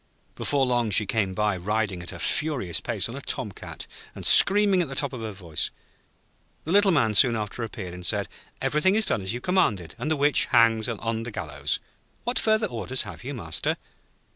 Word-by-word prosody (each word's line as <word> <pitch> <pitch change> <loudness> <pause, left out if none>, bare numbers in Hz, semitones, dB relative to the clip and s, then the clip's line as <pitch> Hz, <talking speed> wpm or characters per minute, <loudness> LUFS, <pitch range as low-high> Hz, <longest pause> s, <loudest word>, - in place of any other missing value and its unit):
Before 140 -2 +1
long 120 -3 +1
she 105 +1 +4
came 100 -2 -1
by 105 -1 +1
riding 100 0 -2
at 85 - -5
a - - -8
furious 140 - 0
pace - - -1
on - - -8
a - - -7
tom - - -4
cat, - - -9 0.3
and - - -7
screaming 200 -1 +6
at 170 - -1
the 135 - -7
top 140 0 0
of 125 - -6
her 110 -1 -4
voice. 85 -6 -4 1.0
The 160 - -3
Little 200 +1 +5
Man 140 - +2
soon 120 +3 +6
after 110 +2 -4
appeared, 95 -5 -6
and 90 0 -9
said: - - 0 0.4
'Everything 170 +7 +2
is 220 0 +2
done - - +1
as 95 - -3
you 120 - -3
commanded, 120 - 0
and 155 - -3
the 155 - +1
Witch 145 -1 +4
hangs 115 0 +3
on 115 0 -3
the 115 - -5
gallows. 110 - -3 0.4
What 245 - 0
further 220 0 +2
orders 130 - -2
have - - -10
you, 140 +3 -5
Master?' 80 -9 -2
115 Hz, 205 wpm, -25 LUFS, 105-150 Hz, 1.0 s, screaming